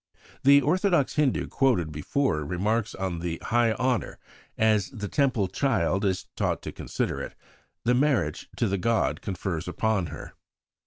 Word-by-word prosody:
The 140 +1 +7
orthodox 175 0 +2
Hindu 150 -4 +1
quoted 110 - +1
before 75 - -1
remarks 105 +8 -1
on 95 -3 -3
the 85 -1 -3
"high 120 -1 +3
honour," 125 0 -1 0.4
as 110 -3 +2
the 105 -4 -6
Temple 130 -6 +1
child 100 - 0
is 95 -2 0
taught - - -1
to - - -5
consider - - -3
it, - - -7 0.5
the 120 - +4
marriage 125 - +1
to - - +1
the 100 0 -1
god 115 +4 +1
confers 90 -3 -3
upon 100 0 0
her. 75 +1 -9
110 Hz, 150 wpm, -26 LUFS, 90-130 Hz, 0.5 s, The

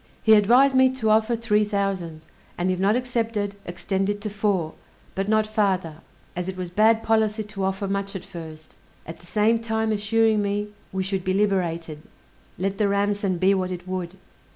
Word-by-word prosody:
He 220 - +6
advised 245 +6 +5
me 260 0 +6
to 220 -4 +1
offer 220 +2 +3
three 215 -2 +1
thousand, 195 -6 -2 0.4
and 180 +1 0
if 185 - -2
not 200 +3 +3
accepted, 230 -5 -2
extend 190 +2 -2
it 205 0 -2
to 210 -1 -4
four; 195 -6 -1 0.4
but 195 +1 -2
not 215 0 +3
farther, 195 -7 0 0.4
as 180 +1 -3
it 185 - -6
was 180 -1 -5
bad 220 +3 +3
policy 220 -1 +1
to 210 -2 -6
offer 195 +1 -1
much 200 0 -3
at 190 - -6
first: 160 -4 -10 0.3
at 165 - -9
the 175 - -18
same 220 +3 +2
time 220 -1 -1
assuring 215 +1 +2
me 205 +1 -2 0.2
we 190 0 -2
should 190 -1 -2
be 185 0 0
liberated, 170 -6 -1 0.6
let 195 +3 -2
the 210 - +3
ransom 200 -1 0
be 190 +3 +3
what 185 -1 -1
it 180 0 -7
would. 185 0 -4
200 Hz, 185 wpm, -24 LUFS, 185-215 Hz, 0.6 s, He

